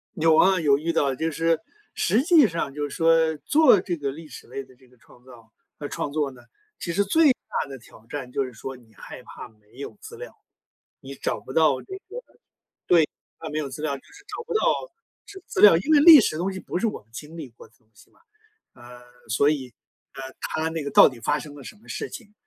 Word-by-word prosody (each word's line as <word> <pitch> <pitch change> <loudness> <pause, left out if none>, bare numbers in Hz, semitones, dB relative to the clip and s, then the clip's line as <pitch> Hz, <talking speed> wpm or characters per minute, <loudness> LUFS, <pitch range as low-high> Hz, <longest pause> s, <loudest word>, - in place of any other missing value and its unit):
有 160 -1 +3
啊 190 0 +5
有 140 -3 +4
遇 165 +3 -2
到， 140 -3 +1
就 160 +5 -2
是 165 +1 0 0.3
实 240 +6 +1
际 320 -6 +6
上 165 -6 -4
就 145 0 -3
是 - - -8
说 165 -1 +3
做 290 - +4
这 175 -3 -3
个 140 -2 -3
历 155 +2 -11
史 - - -12
类 135 +2 -6
的 130 - -20
这 130 0 -24
个 125 - -24
创 120 +1 -22
造 115 -3 -16 0.3
呃， 145 - -6
创 145 - -4
作 150 -3 -1
呢， 125 - -16 0.4
其 170 - -4
实 200 - +2
最 300 +8 +4
大 145 - -5
的 135 - -8
挑 115 -2 -18
战 135 -4 -6
就 135 - -1
是 125 - -10
说 130 +4 -8
你 115 -3 -22
害 - - -11
怕 125 - -11
没 105 +1 -25
有 140 - -8
资 435 +1 -10
料。 - - -9 0.7
你 135 0 -9
找 - - -3
不 130 - -11
到 155 -5 +3
这 380 - -11 0.2
个 470 - -6 0.7
对， 165 -4 +5 0.3
它 160 - -7
没 155 - -4
有 150 -2 -2
资 135 +3 -8
料 145 -3 -1
就 - - -20
是 405 0 -18
找 465 - -7
不 475 - -6
到 435 - +2 0.7
资 390 -2 -12
资 - - -2
料。 205 -5 +9
因 300 - 0
为 295 - +7
历 320 -2 +10
史 155 - -1
的 - - -5
东 190 +3 -1
西 190 - -7
不 - - -4
是 185 - -1
我 215 - -4
们 105 - -34
经 150 +6 -9
历 155 - -7
过 115 - -16
的 115 - -34
东 110 - -37
西 - - -21
嘛， - - -29 0.5
呃， 125 0 -14 0.3
所 140 +6 +3
以， 130 -6 -3 0.4
呃， 135 - -8 0.2
它 160 0 -2
那 160 -1 -4
个 140 - -5
到 - - +8
底 125 - -12
发 145 +5 0
生 145 -1 -10
了 140 - -11
什 - - -10
么 215 - -23
事 - - -5
情， 210 -4 -11
150 Hz, 265 characters per minute, -24 LUFS, 130-180 Hz, 0.7 s, 历